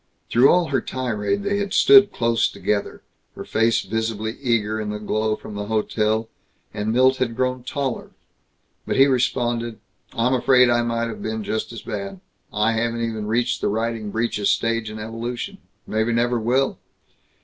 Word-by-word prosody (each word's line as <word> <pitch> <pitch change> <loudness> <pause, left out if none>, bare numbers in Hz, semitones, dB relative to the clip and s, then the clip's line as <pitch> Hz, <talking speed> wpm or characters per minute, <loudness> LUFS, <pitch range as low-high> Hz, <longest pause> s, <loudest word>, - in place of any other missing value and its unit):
Through 125 +4 +6
all 175 -2 +3
her 135 - +1
tirade 130 - -2
they 205 0 0
had 200 -1 -2
stood 205 0 +7
close 115 -1 +1
together, 105 -1 -3 0.3
her - - -7
face 115 0 +1
visibly 110 +1 -3
eager 110 -4 0
in 105 - -4
the 105 - -3
glow 110 +1 -1
from 110 - -10
the 105 0 -5
hotel; 110 0 0 0.5
and 105 +1 -2
Milt 130 +2 +4
had 120 -3 -1
grown 130 0 -1
taller. 135 -1 -3 0.8
But - - -1
he 135 - +7
responded, 120 -3 0 0.3
"I'm 120 +3 +1
afraid 125 -1 +4
I 120 0 +3
might 115 0 -1
have 115 - -7
been 110 0 -3
just 110 +3 -3
as 115 - -8
bad. 100 -3 -5 0.3
I 105 +2 +1
haven't 115 +1 -1
even 110 -2 -4
reached 115 +3 0
the - - +1
riding 110 0 -2
breeches 110 -2 -1
stage 115 -1 0
in 110 - -7
evolution. 120 - -5 0.3
Maybe 110 +2 0
never 120 +1 +1
will." 130 +4 0
115 Hz, 170 wpm, -22 LUFS, 110-125 Hz, 0.8 s, stood